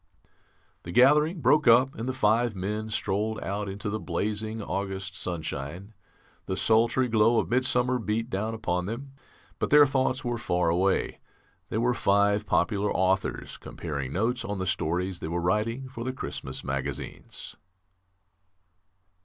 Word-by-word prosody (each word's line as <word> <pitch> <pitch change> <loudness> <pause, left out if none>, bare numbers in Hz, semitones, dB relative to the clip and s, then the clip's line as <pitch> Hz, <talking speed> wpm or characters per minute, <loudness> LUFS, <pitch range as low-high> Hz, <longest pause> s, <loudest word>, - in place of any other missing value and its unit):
'" - - -38 0.4
The 85 - -8
gathering 150 - +4
broke 150 -2 +4
up, 125 +4 +6
and 115 +3 -4
the - - +1
five 115 -2 +2
men 105 +4 -3
strolled 110 +1 -1
out 100 +1 -3
into 100 +2 -5
the 110 +1 -2
blazing 105 +5 -2
August 95 -2 -4
sunshine. 85 +3 -5 0.5
The 95 - -2
sultry 115 +3 +3
glow 115 0 +4
of - - 0
midsummer 125 0 +2
beat 115 +1 -1
down 110 0 -2
upon 90 -4 -2
them, 130 +6 -5 0.5
but - - -1
their 150 0 +8
thoughts 130 0 0
were 120 -1 -1
far 90 -7 +1
away. 95 +3 +1 0.5
They - - -2
were 120 +2 +2
five 100 -1 +2
popular 100 +3 +1
authors 95 +1 0
comparing 70 -5 -5
notes 115 - 0
on 100 0 -3
the 95 - -2
stories 90 +1 -1
they - - -5
were 85 +2 -2
writing 110 +9 0
for 125 -3 -7
the 130 +1 -3
Christmas 130 - -6
magazines. 70 -1 -5
105 Hz, 150 wpm, -27 LUFS, 95-120 Hz, 0.5 s, their